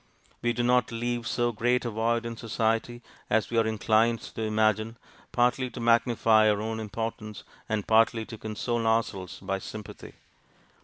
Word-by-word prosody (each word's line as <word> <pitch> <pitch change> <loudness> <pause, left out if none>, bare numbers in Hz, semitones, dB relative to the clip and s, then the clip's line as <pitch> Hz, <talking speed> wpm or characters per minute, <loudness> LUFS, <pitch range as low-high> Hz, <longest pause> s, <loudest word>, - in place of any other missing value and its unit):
We 120 - +1
do 120 +1 -1
not 125 -1 +2
leave 120 0 -2
so 120 -1 0
great 120 +3 +1
a 120 - -2
void 115 +2 0
in 115 0 -4
society 115 +1 -1 0.3
as 110 +1 +1
we 115 - +2
are 115 - +2
inclined 110 +2 +2
to - - -5
imagine, 110 +1 +1 0.3
partly 125 +1 +1
to 125 - -9
magnify 115 -2 +4
our 105 -1 +1
own 110 +1 -3
importance, 110 0 -5 0.3
and 110 -2 -1
partly 115 0 +3
to 110 - -9
console 115 +2 -2
ourselves 110 -5 -1
by 95 0 -2
sympathy. 105 +1 -9
115 Hz, 160 wpm, -27 LUFS, 110-120 Hz, 0.3 s, magnify